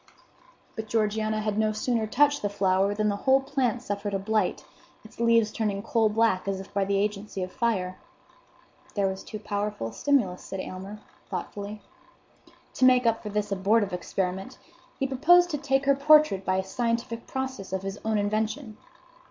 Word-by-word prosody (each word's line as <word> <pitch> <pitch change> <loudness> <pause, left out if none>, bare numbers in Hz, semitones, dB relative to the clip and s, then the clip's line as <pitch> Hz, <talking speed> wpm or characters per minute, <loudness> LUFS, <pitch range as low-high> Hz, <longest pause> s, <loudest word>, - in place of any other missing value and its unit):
But 220 -2 -5
Georgiana 215 0 0
had 215 0 -1
no 215 0 +2
sooner 225 0 -1
touched 290 +5 +3
the 205 - -1
flower 195 0 +1
than 215 0 +1
the 200 -1 0
whole 265 +1 +7
plant 265 -3 -1
suffered 205 -2 -3
a - - +2
blight, 210 0 -1 0.4
its 220 - -15
leaves 230 -2 +3
turning 205 -3 -2
coal 225 -1 +2
black 210 -3 +1
as 195 -1 -1
if 195 - -11
by 200 -1 +1
the 200 0 +1
agency 200 -1 -2
of 185 - -6
fire. 190 -6 -1 1.0
"There 200 -2 +1
was 190 0 -2
too 215 - -7
powerful 205 - -3
a - - -13
stimulus," 240 -11 +1
said 195 - -6
Aylmer, 190 +3 -7 0.3
thoughtfully. 205 0 -6 0.9
To 255 - +2
make 250 -1 +5
up 225 -1 +2
for 210 - -6
this 210 0 -2
abortive 200 +1 +2
experiment, 190 +5 -3 0.4
he 270 - 0
proposed 345 +7 +4
to 295 - -2
take 270 -1 +1
her 275 - +5
portrait 295 -8 +5
by 185 - 0
a 190 - 0
scientific 230 +3 -2
process 260 -8 -4
of 190 0 -2
his 195 +1 -5
own 220 -1 0
invention. 215 +3 -2
215 Hz, 175 wpm, -27 LUFS, 195-235 Hz, 1.0 s, whole